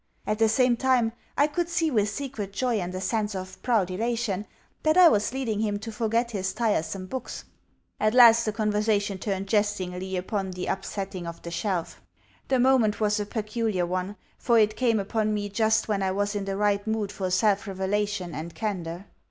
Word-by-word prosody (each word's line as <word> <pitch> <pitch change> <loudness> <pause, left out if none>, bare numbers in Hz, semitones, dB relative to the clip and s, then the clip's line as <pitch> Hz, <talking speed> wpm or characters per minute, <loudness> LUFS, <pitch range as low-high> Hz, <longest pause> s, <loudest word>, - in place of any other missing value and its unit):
At 215 0 -1
the 225 -1 +4
same 245 +1 +3
time, 245 -3 +2 0.2
I 290 - +5
could 340 +3 -2
see 330 -2 +1
with 210 -4 +2
secret 215 -4 -5
joy 240 +1 0
and 180 0 -4
a - - -3
sense 210 +1 -1
of 185 0 -7
proud 215 -7 +1
elation 220 -1 -2 0.3
that 310 +2 +2
I 365 -1 +9
was 210 -7 +1
leading 245 -5 -2
him 210 -2 0
to 225 +2 -7
forget 230 +2 0
his 190 -3 -2
tiresome 195 -5 -1
books. 250 +5 -6 0.6
At 215 +2 +2
last 235 -2 +8
the 215 - 0
conversation 210 -2 0
turned 195 -1 -2
jestingly 190 -3 -1
upon 190 +1 -2
the 180 0 -5
upsetting 195 -2 -4
of 170 0 -8
the 170 - -6
shelf. 175 0 -3 0.5
The 265 - +2
moment 245 -4 +3
was 210 0 +1
a 205 - -3
peculiar 215 -3 -1
one, 185 +3 -3 0.2
for 235 -2 +3
it 215 -1 +3
came 230 -4 +2
upon 215 +1 0
me 205 -1 -3
just 220 +1 +2
when 205 -2 0
I 190 - +1
was 205 +2 -1
in 205 -1 -3
the 195 0 -3
right 205 0 +1
mood 220 -2 -1
for 190 -2 -3
self 205 +2 +2
revelation 195 -1 -2
and 160 +3 -6
candour. 185 -4 -4
210 Hz, 195 wpm, -26 LUFS, 190-225 Hz, 0.6 s, I